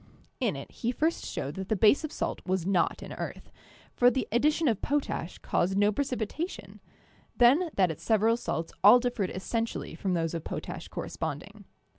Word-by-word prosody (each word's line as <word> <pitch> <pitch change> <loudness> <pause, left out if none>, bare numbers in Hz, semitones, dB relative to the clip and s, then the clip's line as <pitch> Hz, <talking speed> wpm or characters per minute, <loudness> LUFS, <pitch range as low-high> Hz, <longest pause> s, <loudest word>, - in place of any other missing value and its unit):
In - - 0
it - - -8
he 240 - -2
first 320 +6 0
showed 140 - -4
that 190 0 -5
the 220 - +2
base 215 - +4
of 310 - -4
salt - - -3
was 185 -2 -1
not 185 -3 +1
an - - -7
earth, - - -7 0.4
for 245 - +5
the 255 +1 -2
addition 300 +7 +2
of 225 -6 +1
potash 280 - -2
caused 190 +3 0
no 205 +1 +4
precipitation, 265 - -4 0.6
then 280 +9 +5
that 185 -4 +3
its 155 - -9
several 225 +1 +3
salts 165 -8 -4
all 215 +5 +9
differed 240 -6 -1
essentially 225 +3 -3
from 185 +2 -1
those 165 -1 -1
of 165 -2 -4
potash - - -6
corresponding. - - -6
220 Hz, 175 wpm, -29 LUFS, 185-250 Hz, 0.6 s, all